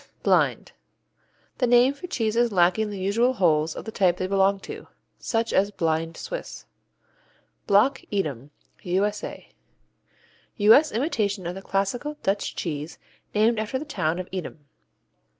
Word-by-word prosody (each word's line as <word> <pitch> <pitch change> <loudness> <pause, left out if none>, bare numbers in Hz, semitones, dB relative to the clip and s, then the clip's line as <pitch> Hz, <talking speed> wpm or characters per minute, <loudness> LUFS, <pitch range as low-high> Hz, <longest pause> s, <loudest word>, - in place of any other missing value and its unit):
Blind - - +2 0.9
The 250 - +2
name 245 +3 +5
for 285 +6 -9
cheeses 235 -5 0
lacking 185 +3 +2
the 205 - -6
usual 215 +7 +1
holes 160 -7 +2
of - - -7
the 220 - -6
type 180 -4 +2
they 185 - -2
belong 195 +1 +2
to, - - -9 0.3
such 230 -1 -1
as 200 +1 +3
blind 165 -3 -2
Swiss. - - -7 1.0
Block 210 +8 +3
Edam 145 - -3 0.3
U.S.A. 200 +4 -2 1.1
U.S. 225 +9 +6
imitation 215 - -1
of 175 - -3
the 195 - -8
classical 220 +11 -2
Dutch 195 +1 -1
cheese 155 -1 -4 0.4
named 220 +2 +3
after 215 +4 -2
the 295 - -6
town 170 - -1
of 185 0 -5
Edam. 170 -5 -6
200 Hz, 135 wpm, -25 LUFS, 180-235 Hz, 1.1 s, U.S